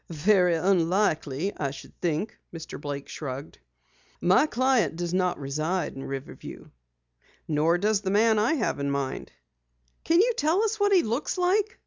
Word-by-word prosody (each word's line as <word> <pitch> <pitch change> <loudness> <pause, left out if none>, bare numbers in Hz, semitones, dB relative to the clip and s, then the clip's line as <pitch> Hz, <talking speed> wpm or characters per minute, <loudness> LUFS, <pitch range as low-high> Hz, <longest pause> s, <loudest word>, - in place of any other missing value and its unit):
"Very 180 +2 +3
unlikely, 175 -2 +1
I 140 -2 -2
think," 160 +7 -4 0.2
Mr. 160 -3 -8
Blake 140 -1 -5
shrugged. 140 0 -7 0.6
"My 185 - +4
client 255 - +1
does 175 0 -3
not 180 -1 0
reside 155 +6 -2
in 135 - -7
Riverview." 135 0 -8 0.8
"Nor 160 +3 +2
does 205 +2 +1
the 195 - -2
man 215 +2 +3
I 235 +9 +2
have 225 - -1
in 140 0 -1
mind." 140 -1 -3 0.7
"Can 335 +1 +3
you 475 +5 +4
tell 320 +8 +2
us 440 0 -1
what 405 0 +3
he 370 -3 +5
looks 235 - -2
like?" 390 +4 +1
180 Hz, 150 wpm, -26 LUFS, 150-235 Hz, 0.8 s, he